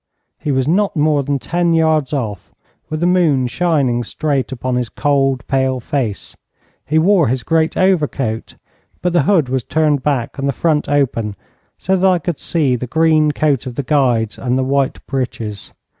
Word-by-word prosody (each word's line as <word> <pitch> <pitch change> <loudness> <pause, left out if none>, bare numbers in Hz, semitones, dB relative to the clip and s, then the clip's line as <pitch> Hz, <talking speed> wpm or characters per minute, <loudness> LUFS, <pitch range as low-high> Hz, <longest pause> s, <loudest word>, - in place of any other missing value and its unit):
He 150 - -2
was 130 0 0
not 195 +5 +1
more 150 -1 +2
than 140 +1 -1
ten 170 +4 0
yards 160 -3 +2
off, 110 - -4 0.4
with 155 0 -4
the - - +2
moon 170 -8 +3
shining 135 -5 0
straight 140 +2 -2
upon 130 0 -3
his 125 -2 -1
cold, 135 -4 0
pale 130 -1 0
face. 120 -4 -3 0.5
He 155 - +1
wore 175 0 +4
his 125 +1 -1
grey 160 +6 +2
overcoat, 150 - 0 0.5
but 180 -1 0
the 175 - +4
hood 160 -2 +2
was 130 -1 -1
turned 150 -1 +1
back, 135 -2 -2
and 140 0 0
the - - 0
front 155 +1 0
open, 120 -7 0 0.4
so 190 - 0
that 190 +1 +2
I 185 -1 +4
could 170 -2 -4
see 145 -7 0
the 125 +1 -5
green 155 +1 +3
coat 145 -3 0
of 125 - -6
the 140 - -2
Guides, 125 -6 +1
and 125 -1 0
the 130 - +1
white 135 0 -1
breeches. 115 -6 -4
140 Hz, 180 wpm, -17 LUFS, 130-160 Hz, 0.5 s, wore